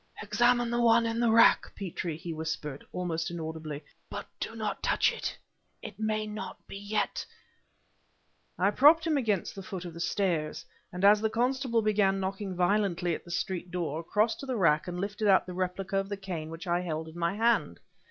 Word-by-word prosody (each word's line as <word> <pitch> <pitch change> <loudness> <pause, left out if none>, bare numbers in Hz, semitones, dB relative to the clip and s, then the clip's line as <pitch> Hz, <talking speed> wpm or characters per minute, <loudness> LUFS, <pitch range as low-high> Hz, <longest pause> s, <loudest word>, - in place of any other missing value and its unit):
"Examine 240 0 +2
the 240 0 +1
one 230 0 +5
in 230 0 -1
the 235 -1 +3
rack, 230 +1 +5
Petrie," 175 -4 -4
he 165 0 -6
whispered, 155 -3 -4
almost 165 -3 -2
inaudibly, 160 -3 -5 0.3
"but - - -5
do 225 - -4
not 215 -2 -3
touch - - +2
it. - - -4 0.5
It - - -9
may 215 0 0
not 210 -3 -6
be - - -9
yet...." 205 +1 -2 1.3
I 195 +3 +3
propped 310 +8 +6
him 325 - +1
up 290 - +3
against 210 -7 0
the 195 - -7
foot 185 -1 -6
of 175 - -7
the 170 - -9
stairs, 165 -4 -1 0.3
and 180 +2 -1
as 205 +1 +7
the 220 - +1
constable 245 0 +1
began 200 -2 +2
knocking 190 0 -3
violently 180 -2 +1
at - - -6
the - - -12
street 180 +1 -3
door, 170 -3 -3
crossed 215 +6 +1
to 275 - -7
the 255 -2 -1
rack 155 -5 +3
and 180 0 -4
lifted 205 +2 -2
out 195 -1 +5
the 180 - -7
replica 185 +2 -2
of 195 0 -1
the 205 - -3
cane 175 -5 -5
which 165 +3 -8
I 175 0 +1
held 160 -2 -3
in 160 +2 -10
my 170 +3 0
hand. 220 - +1
195 Hz, 200 wpm, -29 LUFS, 170-215 Hz, 1.3 s, as